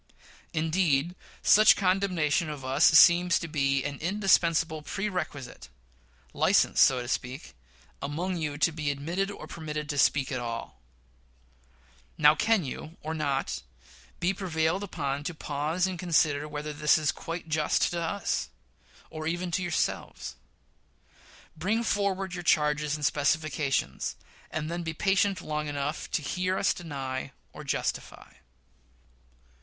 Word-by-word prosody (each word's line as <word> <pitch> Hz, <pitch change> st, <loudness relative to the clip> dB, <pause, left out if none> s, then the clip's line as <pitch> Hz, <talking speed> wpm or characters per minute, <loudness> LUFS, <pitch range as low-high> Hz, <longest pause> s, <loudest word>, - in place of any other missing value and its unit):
Indeed, 160 Hz, -1 st, +1 dB, 0.3 s
such 215 Hz, +1 st, +7 dB
condemnation 180 Hz, -5 st, +1 dB
of 145 Hz, -3 st, -6 dB
us 135 Hz, +4 st, +3 dB
seems 170 Hz, +2 st, +7 dB
to 170 Hz, -, -4 dB
be 140 Hz, -3 st, +1 dB
an 145 Hz, -1 st, -4 dB
indispensable 170 Hz, -4 st, +2 dB
prerequisite 155 Hz, -8 st, -4 dB, 0.6 s
license, -, -, +3 dB
so 125 Hz, -2 st, +5 dB
to -, -, -8 dB
speak 125 Hz, -, -4 dB, 0.5 s
among 170 Hz, +6 st, -2 dB
you, 150 Hz, -3 st, -3 dB
to 160 Hz, +3 st, +3 dB
be 150 Hz, -2 st, -3 dB
admitted 170 Hz, +8 st, -2 dB
or 205 Hz, -, -8 dB
permitted 150 Hz, -2 st, -5 dB
to 145 Hz, -, -1 dB
speak 135 Hz, -1 st, +3 dB
at 130 Hz, -, -1 dB
all: 115 Hz, -, -6 dB, 1.4 s
Now; 150 Hz, 0 st, +7 dB
can 215 Hz, +4 st, +2 dB
you, 155 Hz, +5 st, -7 dB
or 155 Hz, +1 st, -3 dB
not, 145 Hz, -4 st, -1 dB, 0.6 s
be 180 Hz, +3 st, +1 dB
prevailed 175 Hz, -2 st, -1 dB
upon 145 Hz, -7 st, -3 dB
to 175 Hz, -, -3 dB
pause, 155 Hz, +5 st, -1 dB
and 185 Hz, -2 st, -3 dB
to -, -, -6 dB
consider 150 Hz, -3 st, +2 dB
whether 150 Hz, 0 st, -5 dB
this 150 Hz, -1 st, +3 dB
is 155 Hz, -2 st, +1 dB
quite 165 Hz, 0 st, -6 dB
just 155 Hz, -1 st, +1 dB
to 170 Hz, -1 st, -2 dB
us, 170 Hz, +5 st, -2 dB, 0.6 s
or 155 Hz, -1 st, -5 dB
even 175 Hz, +2 st, -2 dB
to 180 Hz, -, 0 dB
yourselves? 160 Hz, -, -2 dB, 1.2 s
Bring 210 Hz, +9 st, 0 dB
forward 195 Hz, -3 st, -1 dB
your 175 Hz, -, -4 dB
charges 150 Hz, -2 st, +2 dB
and 150 Hz, -1 st, -3 dB
specifications, 150 Hz, -1 st, 0 dB, 0.3 s
and 155 Hz, -1 st, -3 dB
then 170 Hz, +2 st, -3 dB
be 165 Hz, -1 st, -4 dB
patient 195 Hz, +1 st, +1 dB
long 150 Hz, 0 st, -3 dB
enough 145 Hz, 0 st, -3 dB
to 155 Hz, -, -1 dB
hear 185 Hz, +5 st, -1 dB
us 200 Hz, -, +2 dB
deny 135 Hz, -5 st, -5 dB, 0.2 s
or -, -, -9 dB
justify. -, -, -3 dB
155 Hz, 140 wpm, -28 LUFS, 145-180 Hz, 1.4 s, such